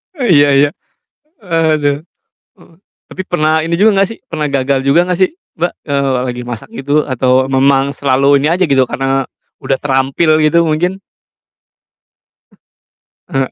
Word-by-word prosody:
Iya 175 - +3
iya. 145 +1 +4 0.7
Aduh. 155 -4 0 0.5
Oh, 165 - -21 0.3
tapi 190 - -6
pernah 155 -2 0
ini 170 +1 -2
juga 210 -1 +4
gak - - -5
sih, 225 - -9
pernah 155 -2 -3
gagal 135 0 0
juga 140 +5 +4
gak 180 0 -1
sih, 185 - +3 0.3
Mbak? 175 +2 -1 0.2
Eee, 140 -1 0
la - - -1
lagi 125 0 -5
masak 120 - -7
gitu 145 -10 -5 0.2
atau 130 0 +1
memang 135 +1 +2
selalu 140 0 +1
ini 150 - 0
aja, 185 +1 +1
gitu, 135 -2 +3
karena 135 0 -1 0.4
udah 135 - -1
terampil, 135 +3 0
gitu 160 +2 +3
mungkin? 175 +5 -1 2.3
Eh. 135 - -3
145 Hz, 145 wpm, -14 LUFS, 135-165 Hz, 2.3 s, iya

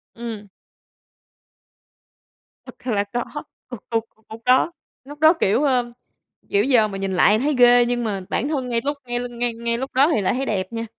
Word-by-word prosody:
Ừm. 225 -3 -7 2.2
Thật 250 - -13
là 205 -4 +1
có. 245 +5 -4 0.3
Thực 245 - -5
sự 230 - +2 0.3
lúc 220 +1 -10
đó 255 +6 +4 0.3
lúc 290 +2 -11
đó, 315 +2 +6
kiểu, 210 +9 +2
ơ, 250 -4 +1 0.6
kiểu, 200 0 +2
giờ 240 -4 +3
mà 195 -2 -6
nhìn 195 0 -3
lại 200 +3 +4
thì - - -3
thấy 295 0 +1
ghê, 245 0 +6
nhưng 240 0 -1
mà 200 -3 -2
bản 260 - -1
thân 270 -5 -2
ngay 235 -1 0
lúc 285 0 -1
ngay 240 0 -2
ngay 240 0 -2
ngay 235 0 -2
lúc 265 +3 -5
đó 275 +4 +4
thì - - +1
lại 185 - +1
thấy 265 +2 -2
đẹp 195 -3 -3
nha. 230 0 -3
240 Hz, 195 wpm, -22 LUFS, 220-260 Hz, 2.2 s, đó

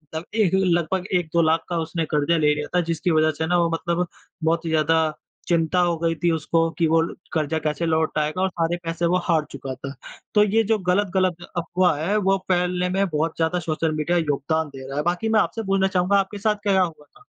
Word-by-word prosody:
त 160 - -3
एक 205 -6 +2
लगभग 180 0 +1
1-2 170 -1 +1
लाख 160 +1 +2
का 175 - -1
उसने 160 +1 -2
कर्जा 150 +3 +2
ले 150 -1 +3
लिया 150 0 -4
था 180 - +4
जिसकी 170 +2 0
वजह 155 0 +3
से 160 - -1
ना 175 - +2
वो 170 -1 +2
मतलब 170 +1 -1 0.4
बहुत 165 +1 +1
ही - - -2
ज़्यादा 160 0 +2 0.5
चिंता 170 +1 +1
हो 175 -2 +2
गई 165 0 0
थी 170 - +4
उसको 165 +1 +1
कि 165 -2 +2
वो 165 +1 +3 0.3
कर्जा 160 -1 0
कैसे 155 +2 -2
लौटाएगा 160 +1 0
और 190 - +2
सारे 170 0 -1
पैसे 165 +1 -2
वो 180 +2 +3
हार 160 -3 +1
चुका 135 -1 -6
था। 135 +1 -7 0.4
तो 210 - +7
ये 220 +2 +2
जो 220 +1 +1
गलत-गलत 185 -3 0
अफ़वाह 175 -1 +1
है 205 - +1
वो 195 -1 +2
फैलने 180 0 +1
में 195 +2 +1
बहुत 160 0 -1
ज़्यादा 165 +2 +1
सोशल 160 -1 -1
मीडिया 155 +3 0
योगदान 160 0 -1
दे 130 0 -8
रहा 135 +1 -6
है। 150 - 0
बाकी 180 +6 -1
मैं 220 - +4
आपसे 225 +1 -1
बोलना 195 0 +3
चाहूँगा 190 +1 +2
आपके 195 +1 -1
साथ 210 +1 +1
क्या-क्या 195 -2 +3
हुआ 155 -4 -6
था? 415 - -23
170 Hz, 220 wpm, -23 LUFS, 160-180 Hz, 0.5 s, तो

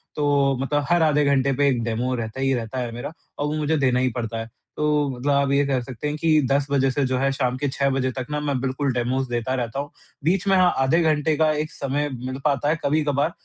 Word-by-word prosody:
तो 140 -2 +2
मतलब 145 +1 0
हर 175 -1 +4
आधे 150 -2 +3
घंटे 140 -1 +2
पे 145 0 +3
एक 125 -3 0
डेमो 120 +3 -1
रहता 115 +2 -5
ही 135 0 +2
रहता 120 +1 -3
है 120 -2 -3
मेरा 120 +6 -5 0.3
और 145 - 0
वो 150 - -2
मुझे 155 +1 +1
देना 130 -3 +2
ही 130 - +2
पड़ता 115 -1 -3
है। 115 +1 -6 0.3
तो 150 -1 +1
मतलब 130 +2 -2
आप 140 0 +2
ये 140 +1 +3
कह 135 -2 +1
सकते 125 +3 -6
हैं 150 - -2
कि 155 -1 +3
10 140 0 +2
बजे 135 -1 +3
से 140 +2 0
जो 130 0 0
है 135 +1 +1
शाम 130 -2 -1
के 145 - -1
6 140 +1 0
बजे 130 -1 0
तक 130 0 -5
ना 150 - -1
मैं 145 -3 -1
बिल्कुल 135 +1 -1
डेमोज़ 125 +2 -1
देता 120 +1 -2
रहता 120 +1 -3
हूँ, 145 +1 -5 0.3
बीच 185 +5 +1
में 195 - +4
हाँ, 180 -1 +4
आधे 135 +6 +3
घंटे 155 -1 +2
का 155 -1 +3
एक 155 0 -2
समय 145 +2 -2
मिल 130 +2 -5
पाता 145 -1 +1
है 160 - +1
कभी-कभार, 145 +1 +1
140 Hz, 255 wpm, -23 LUFS, 130-150 Hz, 0.3 s, हर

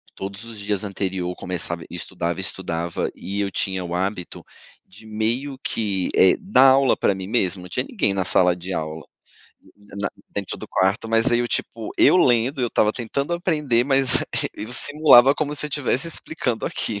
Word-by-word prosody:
todos 100 +2 -7
os 115 -2 -10
dias 100 -1 -2
anterior 95 -3 -3
começava 85 -2 -4
estudava, 85 0 -4
estudava 85 -3 -2
e 100 +1 -5
eu 100 - -1
tinha 95 -2 -2
o 85 0 -4
hábito 95 0 -3 0.4
de 105 +4 -17
meio 115 +6 -2
que, 100 -4 -1
eh, 95 - +6
dar 135 -9 +5
aula 135 0 +4
pra 100 - +1
mim 95 0 -6
mesmo? 95 -4 0
Não 90 - -11
tinha 125 +9 -2
ninguém 145 - 0
na 95 -2 -1
sala 90 0 +4
de 90 +2 -6
aula, 80 -1 -4 0.7
na 105 -1 -17
na - - 0 0.2
dentro - - -5
do - - -8
quarto, 95 +4 0
mas 115 +3 +3
aí, 120 - +4
eu, 120 - -1
tipo, 115 -2 -3
eu - - +6
lendo, 130 -3 +3
eu 125 - +2
estava 105 -1 +2
tentando 140 +7 -3
aprender, 150 -9 +1
mas 135 -2 +2 0.2
aí - - 0 0.2
eu 120 - -8
simulava 140 -1 +6
como 150 -1 -2
se 150 - -2
eu - - -8
estivesse 145 +1 -1
explicando 140 -7 -3
aquilo. 105 -2 -3
105 Hz, 185 wpm, -22 LUFS, 95-130 Hz, 0.7 s, eh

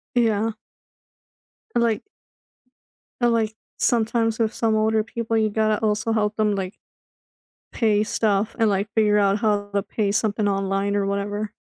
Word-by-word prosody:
Yeah. 225 -2 +2 1.2
Like 235 -2 +1 1.2
And, 240 0 +4
like, 220 -2 0 0.2
sometimes 225 -1 +1
with 220 -1 +1
some 225 -2 +1
older 220 0 +2
people, 230 0 -2
you 215 -1 +2
gotta 215 0 +1
also 215 +1 0
help 210 -1 0
them, 210 -2 +2
like, 190 0 -4 1.0
pay 215 -3 +2
stuff 210 -1 0
and, 225 -3 +3
like, 200 +1 0
figure 210 -2 +3
out 200 0 +2
how 205 -2 0
to 200 -1 +1
pay 205 -1 -1
something 210 -1 0
online 195 0 0
or 200 -1 +1
whatever. 205 +2 -3
215 Hz, 145 wpm, -23 LUFS, 205-225 Hz, 1.2 s, And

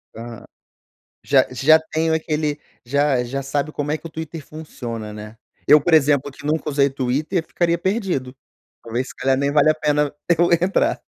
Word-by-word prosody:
Ah. 115 0 -9 0.8
Já - - +3
já 155 +5 +5
tenho 160 0 -1
aquele 155 -2 -1 0.3
já 140 0 +1
já 135 +3 -4
sabe 145 +2 -2
como 145 0 -3
é 155 - -1
que 165 - -11
o - - -8
Twitter 160 -1 -7
funciona, 120 -8 -7
né. 105 +1 -10 0.3
Eu, 150 - +8
por 170 - -1
exemplo, 145 -2 +3
que 140 - -15
nunca 155 0 -1
usei 140 -1 +3
Twitter 135 +6 -1
eu - - -30
ficaria 170 -1 0
perdido. 185 - -2 0.5
Talvez, 120 +3 -3
se - - -11
calhar 130 0 +1
nem 140 +1 0
vale 150 +1 +5
a 155 - +2
pena 150 -1 0 0.3
eu 175 0 +4
entrar. 185 +3 +1
145 Hz, 185 wpm, -21 LUFS, 130-160 Hz, 0.8 s, Eu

